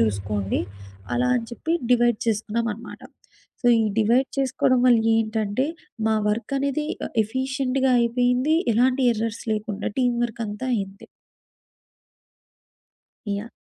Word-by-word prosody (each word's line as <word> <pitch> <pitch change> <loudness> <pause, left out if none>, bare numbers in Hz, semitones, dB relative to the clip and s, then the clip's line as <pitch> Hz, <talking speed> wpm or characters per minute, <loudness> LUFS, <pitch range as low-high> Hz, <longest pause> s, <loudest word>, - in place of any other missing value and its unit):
చూసుకోండి. 100 -2 0 0.5
అలా 250 +1 +1
అని 230 -2 -3
చెప్పి 320 +7 -3 0.2
డివైడ్ 240 -2 +3
చేసుకున్నామనమాట. 225 +1 -2 0.6
సో, - - 0 0.2
ఈ - - +1
డివైడ్ 240 +5 +3
చేసుకోడం 255 -1 +2
వల్ల 240 -2 +6 0.2
ఏంటంటే, 220 +2 0 0.4
మా 220 - +2
వర్కనేది 275 +6 -1 0.2
ఆహ్, - - -12
ఎఫీషియంట్‌గా 260 +2 0
అయిపోయింది 250 +5 +2 0.2
ఎలాంటి 255 +3 +3
ఎర్రర్స్ 225 0 -3
లేకుండా. 210 -1 -3
టీమ్ 245 -2 +2
వర్కంతా 225 0 -5
అయింది. 195 -2 -5 2.2
యాహ్! 205 +3 -3
235 Hz, 105 wpm, -24 LUFS, 215-255 Hz, 2.2 s, వల్ల